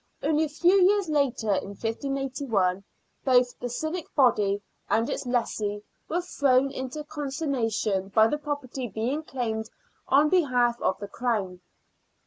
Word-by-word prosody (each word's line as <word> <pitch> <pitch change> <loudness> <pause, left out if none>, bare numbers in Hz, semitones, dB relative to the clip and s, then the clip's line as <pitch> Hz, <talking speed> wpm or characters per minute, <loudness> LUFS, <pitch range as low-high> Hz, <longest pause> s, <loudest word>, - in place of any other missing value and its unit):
Only 310 +1 +2
a - - -6
few 355 +6 +4
years 390 -1 +4
later, 270 -8 +1
in 195 +1 -3
1581, 230 -5 -1 0.4
both 250 -2 +3
the 245 - -4
civic 315 +7 -3
body 210 -7 +3 0.3
and 225 +2 +2
its - - -3
lessee 210 -4 -1 0.3
were 345 +2 0
thrown 275 -5 +2
into 265 +3 -5
con 295 -1 -5
sternation 225 - -1
by 220 +2 +6
the 295 +7 0
property 285 -4 -4
being 235 +8 -2
claimed 225 -7 -3 0.4
on 290 +3 +4
behalf 250 -9 +2
of 190 - +1
the 205 - -7
Crown. 200 -7 -2
255 Hz, 140 wpm, -27 LUFS, 220-295 Hz, 0.4 s, by